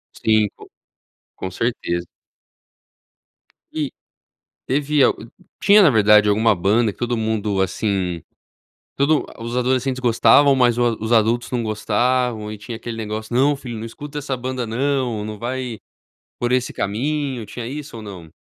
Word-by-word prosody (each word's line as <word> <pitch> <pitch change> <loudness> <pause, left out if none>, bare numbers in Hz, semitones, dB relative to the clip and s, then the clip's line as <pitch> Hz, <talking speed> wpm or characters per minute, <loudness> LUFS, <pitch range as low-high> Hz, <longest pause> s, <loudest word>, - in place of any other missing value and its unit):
Sim, 110 -1 +2
co - - -15 0.7
com 95 - -5
certeza. 90 -5 -2 1.7
E 150 -4 -2 0.8
teve 145 +2 +1
al - - +3 0.5
tinha, 205 +1 +6
na 175 - +6
verdade, 105 -2 +5
alguma 110 +2 +3
banda 105 +5 +2
que - - -23
todo 120 0 -1
mundo, 110 -3 -1
assim, 95 -3 -1 0.7
todo 145 +2 +2
ah, 115 - -11
os 120 +1 -4
adolescentes 130 +1 0
gostavam, 125 +3 +5
mas 120 -2 +3
o 120 -2 +1
os 110 +1 -4
adultos 115 +1 +2
não 125 -2 0
gostavam 110 +1 0
e 105 - -7
tinha 115 +3 -7
aquele 115 0 -6
negócio: 110 +1 -5
"Não, 140 +3 +4
filho, 125 -4 -7
não 110 - -6
escuta 145 +6 -8
essa 140 -2 -2
banda 130 0 -4
não. 125 -1 -1
Não 105 -1 -6
vai 125 -1 -4 0.6
por 120 0 -1
esse 125 0 +1
caminho". 130 +3 -2
Tinha 115 +3 -7
isso 140 0 -7
ou - - -8
não? 90 -6 -10
120 Hz, 155 wpm, -21 LUFS, 110-130 Hz, 1.7 s, tinha